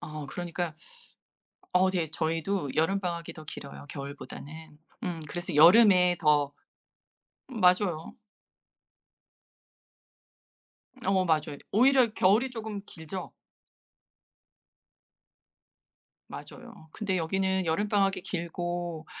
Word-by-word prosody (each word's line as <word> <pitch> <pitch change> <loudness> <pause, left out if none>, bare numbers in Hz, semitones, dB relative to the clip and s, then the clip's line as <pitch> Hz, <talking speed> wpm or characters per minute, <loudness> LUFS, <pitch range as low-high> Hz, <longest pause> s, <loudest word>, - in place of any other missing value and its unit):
어 150 -2 -7
그러니까 175 +1 -4 1.0
어 185 +1 +4
되게 170 -4 -1
저희도 165 -1 -2
여름방학이 170 0 -1
더 155 - -11
길어요 140 0 -9
겨울보다는. 150 +2 -9 0.3
음 170 -4 -3
그래서 175 0 -4
여름에 180 +1 +7
더 145 -2 +3 0.9
맞아요. 180 - +1 2.9
어 190 -1 +2
맞아요. 155 -3 0
오히려 250 0 +4
겨울이 215 +8 +3
쪼금 220 -3 -5
길죠? 170 +3 -7 3.0
맞아요. 160 - -11
근데 195 -3 -1
여기는 190 +2 0
여름방학이 195 +3 +1
길고 175 -2 -4
175 Hz, 205 characters per minute, -28 LUFS, 160-195 Hz, 3.0 s, 여름에